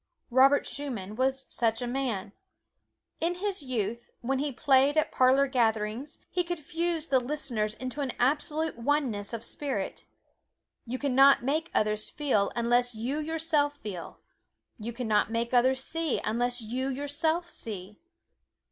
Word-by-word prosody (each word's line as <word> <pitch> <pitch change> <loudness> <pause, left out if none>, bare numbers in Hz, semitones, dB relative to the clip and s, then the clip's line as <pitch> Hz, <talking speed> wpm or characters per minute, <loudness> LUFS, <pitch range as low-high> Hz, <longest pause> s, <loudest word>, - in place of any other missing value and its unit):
Robert 270 +3 +5
Schumann 230 -9 -5
was 265 +2 +1
such 225 -2 +1
a 245 - -2
man. 240 -6 -2 0.9
In 340 +2 0
his 390 -1 -2
youth, 235 -3 -3
when 265 +2 0
he 290 +1 -1
played 275 +2 +3
at 310 - +2
parlor 260 +2 +5
gatherings 230 +1 0
he 360 - +1
could 350 -1 -4
fuse 330 +2 -2
the 265 -1 +4
listeners 245 -5 -2
into 255 +4 -5
an 270 -3 -1
absolute 300 +2 0
oneness 235 -6 0
of 230 -1 -5
spirit. 280 +3 -4 0.8
You 250 +2 -2
can 280 -1 -1
not 275 0 +6
make 310 +6 0
others 215 0 +1
feel 260 -9 +1
unless 240 0 +2
you 250 +7 -2
yourself 310 -2 0
feel; 195 - -7 0.6
you 225 +2 -4
can 240 0 -4
not 210 -1 +3
make 235 +1 -1
others 260 +2 +3
see 325 -2 -1
unless 245 +3 0
you 250 +4 -2
yourself 290 +5 0
see. 205 - -5
260 Hz, 145 wpm, -29 LUFS, 230-290 Hz, 0.9 s, not